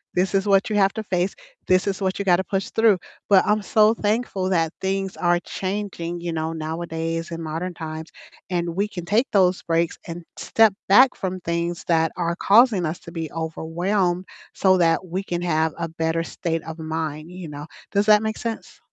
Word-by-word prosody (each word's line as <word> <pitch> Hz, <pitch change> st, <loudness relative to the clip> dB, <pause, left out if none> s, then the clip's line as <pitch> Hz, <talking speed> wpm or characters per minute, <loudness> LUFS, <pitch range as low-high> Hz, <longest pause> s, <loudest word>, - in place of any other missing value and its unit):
this 185 Hz, +2 st, +1 dB
is 195 Hz, +1 st, +1 dB
what 195 Hz, +1 st, +3 dB
you 210 Hz, -, 0 dB
have 195 Hz, -1 st, +4 dB
to 220 Hz, -, -4 dB
face. 180 Hz, -1 st, -1 dB, 0.3 s
This 185 Hz, 0 st, +3 dB
is 195 Hz, 0 st, -2 dB
what 190 Hz, -1 st, 0 dB
you 200 Hz, -, -2 dB
gotta 185 Hz, 0 st, +4 dB
push 195 Hz, -1 st, -2 dB
through." 220 Hz, -3 st, +4 dB, 0.3 s
But 195 Hz, -2 st, +6 dB
I'm 210 Hz, 0 st, +2 dB
so 215 Hz, +2 st, +4 dB
thankful 210 Hz, -3 st, -1 dB
that 165 Hz, -4 st, +1 dB
things 195 Hz, 0 st, -2 dB
are 175 Hz, -1 st, +2 dB
changing, 185 Hz, -4 st, -4 dB
you 170 Hz, -1 st, -3 dB
know, 160 Hz, 0 st, -2 dB
nowadays 165 Hz, +1 st, -3 dB
in 165 Hz, -, -5 dB
modern 165 Hz, +3 st, -4 dB
times, 160 Hz, -1 st, -7 dB, 0.4 s
and 170 Hz, -2 st, -1 dB
we 200 Hz, +2 st, +1 dB
can 180 Hz, -5 st, -7 dB
take 220 Hz, +8 st, +2 dB
those 185 Hz, -2 st, +3 dB
breaks 165 Hz, 0 st, 0 dB
and 170 Hz, 0 st, -6 dB
step 225 Hz, -3 st, +4 dB
back 250 Hz, +7 st, +7 dB
from 185 Hz, -1 st, -3 dB
things 170 Hz, 0 st, -2 dB
that 165 Hz, -1 st, +2 dB
are 170 Hz, -1 st, -1 dB
causing 210 Hz, -3 st, +5 dB
us 160 Hz, +2 st, -3 dB
to 170 Hz, -, -11 dB
be 165 Hz, -3 st, -4 dB
overwhelmed 175 Hz, +3 st, -1 dB, 0.3 s
so 190 Hz, -1 st, +4 dB
that 170 Hz, +1 st, +2 dB
we 185 Hz, +2 st, -3 dB
can 175 Hz, -2 st, -3 dB
have 160 Hz, -2 st, +1 dB
a 165 Hz, -1 st, -3 dB
better 160 Hz, +1 st, -1 dB
state 165 Hz, -1 st, -3 dB
of 160 Hz, 0 st, -8 dB
mind, 160 Hz, 0 st, -4 dB
you 180 Hz, -3 st, -8 dB
know. 145 Hz, 0 st, -7 dB, 0.3 s
Does 200 Hz, +1 st, +2 dB
that 210 Hz, 0 st, +6 dB
make 220 Hz, 0 st, -2 dB
sense? 230 Hz, -1 st, -6 dB
175 Hz, 195 wpm, -23 LUFS, 165-195 Hz, 0.4 s, back